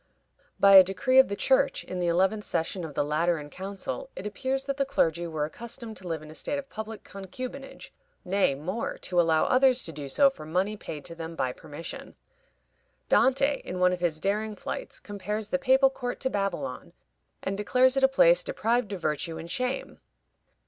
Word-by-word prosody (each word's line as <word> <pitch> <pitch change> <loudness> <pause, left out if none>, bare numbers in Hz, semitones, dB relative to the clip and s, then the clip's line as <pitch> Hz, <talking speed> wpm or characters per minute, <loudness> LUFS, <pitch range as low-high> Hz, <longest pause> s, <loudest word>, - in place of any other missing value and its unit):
By 195 -1 +8
a 190 - +11
decree 255 +8 +3
of 265 - +7
the 200 - -3
Church 270 +5 +2
in 185 - -5
the 175 - 0
eleventh 190 +5 +2
session 175 +1 -2
of 155 -4 -7
the - - +2
Lateran 150 0 0
Council 200 - -5
it - - -7
appears 260 +6 -2
that 275 0 -3
the 275 - +2
clergy 170 - 0
were 155 -2 -2
accustomed 230 - -6
to 185 0 -8
live 160 -2 -3
in 155 - -11
a - - -10
state 285 - -2
of 280 -1 -7
public 220 0 -7
concubinage, 255 +8 -8 0.3
nay, 185 -6 +2
more, 185 +11 -4
to 175 -1 +1
allow 160 -2 +3
others 255 -1 +4
to 165 - -3
do 145 -2 -7
so 275 - +5
for 265 - -11
money 185 +7 -1
paid 150 -7 -8
to - - -7
them 165 0 -7
by 130 -5 -1
permission. 160 +3 -8 0.9
Dante, 275 +2 +3
in 180 - -5
one 180 0 +4
of 180 - -3
his 170 -3 0
daring 210 +4 -1
flights, - - -6
compares 205 +1 -4
the 275 - 0
papal 265 0 +4
court 245 -2 -5
to 260 - 0
Babylon, 200 +7 -3 0.5
and 195 - -2
declares 250 +6 +3
it 270 - +1
a - - +8
place - - +5
deprived 240 - 0
of 185 - -6
virtue 155 +1 -2
and 165 +1 -8
shame. 255 +1 -3
200 Hz, 195 wpm, -27 LUFS, 170-260 Hz, 0.9 s, a